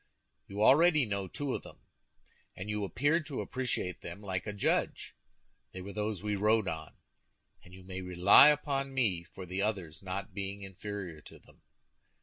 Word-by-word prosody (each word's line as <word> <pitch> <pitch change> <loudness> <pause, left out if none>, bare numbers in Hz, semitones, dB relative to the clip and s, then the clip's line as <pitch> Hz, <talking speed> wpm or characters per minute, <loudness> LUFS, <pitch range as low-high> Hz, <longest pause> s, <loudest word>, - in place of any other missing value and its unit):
You 100 +2 -2
already 150 +2 +6
know 100 -3 -2
two 140 +7 -3
of - - -3
them, - - -13 0.8
and 95 +3 -5
you 105 -1 -2
appeared 145 - +1
to 140 - -4
appreciate 125 -8 -3
them 85 +3 -8
like 95 -1 -4
a - - -1
judge. 100 -1 0 0.6
They 95 - -6
were 100 +1 -7
those 105 -2 -3
we 105 -1 0
rode 105 +1 +2
on; 80 -3 -5 0.7
and 90 - -16
you 95 0 -12
may 95 0 -6
rely 90 +8 +7
upon 140 -2 +1
me 105 -10 +1
for 90 +2 -10
the 90 +2 -3
others 95 -7 -2
not 95 0 -5
being 100 0 -5
inferior 95 -4 -7
to - - -14
them. - - -22
100 Hz, 170 wpm, -31 LUFS, 95-115 Hz, 0.8 s, rely